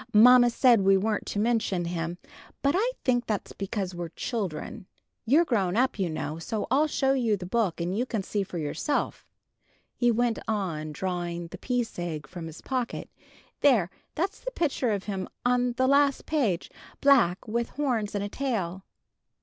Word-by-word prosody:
"Mamma 245 +2 +8
said 235 -2 +5
we 195 0 +5
weren't 210 +2 -1
to - - -4
mention 210 -5 +1
him, 170 0 -3 0.5
but 280 +1 +3
I 470 +6 +1
think 245 -2 +2
that's 210 -3 -2
because 195 -1 -3
we're 175 -1 -5
children. 185 0 -4 0.4
You're 305 +8 +5
grown 200 - +1
up, 255 -3 +1
you 185 -3 +1
know, 155 0 -4
so 215 +5 -3
I'll 290 +4 +4
show 270 -2 +1
you 235 -6 +1
the 180 - -7
book, 200 -3 0
and 175 +2 -1
you 245 +4 0
can 220 -5 -2
see 205 +2 -1
for 185 -2 -5
yourself," 160 - -2 0.7
he 240 - +2
went 235 0 +1
on, 175 -8 -2
drawing 175 0 -3
"The - - -9
Peace 245 -6 -2
Egg" 160 -4 -4
from 170 +2 -8
his 160 0 -10
pocket: 255 -3 -3 0.5
"there, 225 -11 +4 0.2
that's 370 +5 -1
the - - -4
picture 300 - 0
of 200 -3 -1
him, 195 -3 -4 0.2
on 245 0 +2
the 255 +2 +1
last 280 0 +3
page; 240 - 0 0.3
black, 245 -11 +4
with 235 +2 -1
horns 245 -8 -1
and 200 - -1
a - - -2
tail." 195 -9 -2
215 Hz, 175 wpm, -27 LUFS, 180-250 Hz, 0.7 s, Mamma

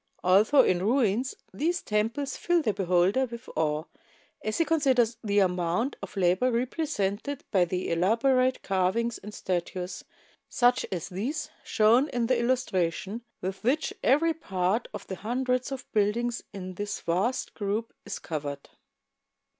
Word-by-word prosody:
Although 210 +10 +6
in 180 - +2
ruins 235 +2 +1 0.2
these 345 +5 -1
temples 225 +7 -1
fill 345 -2 +1
the 215 - +1
beholder 190 +7 +2
with 235 +1 -9
awe 155 -1 0 0.6
as 215 0 -1
he 330 - +3
considers 260 -8 +2
the 205 -2 0
amount 180 +6 +1
of - - -8
labor 185 +6 +3
represented 245 -1 -2
by 185 -4 +4
the 180 +1 -3
elaborate 255 +9 +2
carvings 195 +5 0
and 210 - -9
statues, 180 -1 -3 0.5
such 245 0 +3
as 180 -2 -3
these 245 - -3
shown 235 +6 +4
in 240 -1 0
the 250 0 +2
illustration, 210 -4 0 0.2
with 190 +3 -4
which 300 - +1
every 320 +6 +4
part 195 - -1
of - - -7
the 190 - -6
hundreds 250 +4 -1
of 265 -2 -5
buildings 230 +3 +1
in 185 -1 -7
this 205 +3 -4
vast 200 +10 -1
group 210 +2 -2
is 205 -2 -5
covered. 145 -3 -5
220 Hz, 140 wpm, -28 LUFS, 185-255 Hz, 0.6 s, Although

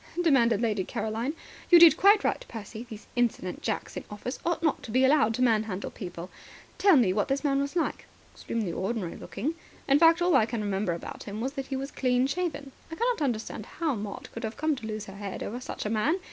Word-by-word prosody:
demanded 240 - +3
Lady 210 -4 +1
Caroline. 225 - -3 0.3
"You 350 - +9
did 335 -1 +9
quite 405 +2 +5
right, - - 0
Percy. 225 +1 -8
These 215 -1 -9
insolent 235 -7 -1
jacks - - -3
in - - -5
office 210 +5 -6
ought 340 0 -1
not 315 - +1
to 255 - -10
be 255 +4 +3
allowed 260 -6 +4
to 255 - +1
manhandle 215 -5 0
people. 175 0 -8 0.5
Tell 390 -6 +6
me, 210 -8 +3
what 205 +1 0
this 275 +2 -1
man 275 -2 +2
was 280 +3 -3
like?" 335 - -1 0.3
"Extremely 220 -6 -3
ordinary 195 -2 -3
looking. 265 +11 -4 0.3
In 275 +1 +5
fact, 330 +1 +6
all 350 -2 +3
I 225 -5 +4
can 230 -2 -3
remember 195 -3 -1
about 170 - -7
him 205 +1 -6
was 260 +4 -2
that 270 -1 -5
he 270 - -3
was 270 +1 -4
clean 250 -1 +1
shaven. 285 -2 -3 0.2
I - - -4
cannot 475 0 0
understand 225 -5 -2
how 320 -3 +1
Maud 205 -3 -6
could 230 - -7
have 220 0 -4
come 310 -1 +1
to 225 - -7
lose 215 -1 -4
her 195 0 -10
head 200 -2 -5
over 240 +4 -5
such - - -6
a - - -1
man. 280 - +1
245 Hz, 225 wpm, -28 LUFS, 215-285 Hz, 0.5 s, You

